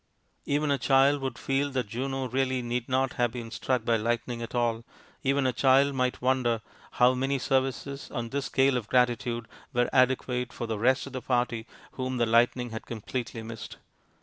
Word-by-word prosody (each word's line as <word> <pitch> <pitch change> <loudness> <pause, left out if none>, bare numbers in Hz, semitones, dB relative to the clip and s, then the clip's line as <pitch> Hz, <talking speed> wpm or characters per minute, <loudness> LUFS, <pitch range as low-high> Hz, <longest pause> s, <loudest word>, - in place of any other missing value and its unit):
Even 145 +1 +1
a 140 - +1
child 135 +2 +4
would 130 -3 -3
feel 135 +1 0
that 130 -3 -1
Juno 130 +3 -3
really 130 0 0
need 120 0 -3
not 130 0 +1
have 120 -1 +3
been 115 -2 -7
struck 120 +1 -1
by 115 -1 +3
lightning 120 +2 -2
at 115 - -6
all; 115 -1 0 0.4
even 140 0 +1
a 130 - +2
child 135 +3 +4
might 125 -1 -1
wonder 125 -3 +2 0.3
how 125 +1 +5
many 135 +2 0
services, 135 +1 -1
on 115 -1 -4
this 140 +2 -2
scale 135 -1 +3
of 115 -4 -4
gratitude, 120 -2 +1 0.3
were 120 0 +2
adequate 125 -1 +2
for - - -5
the 110 -2 -3
rest 130 +4 +3
of 135 - -10
the 130 - -4
party 120 -3 -1 0.2
whom 130 -1 -3
the 120 - +3
lightning 120 +1 +2
had 110 - -7
completely 115 0 -5
missed. 110 -1 -8
125 Hz, 185 wpm, -28 LUFS, 120-135 Hz, 0.4 s, how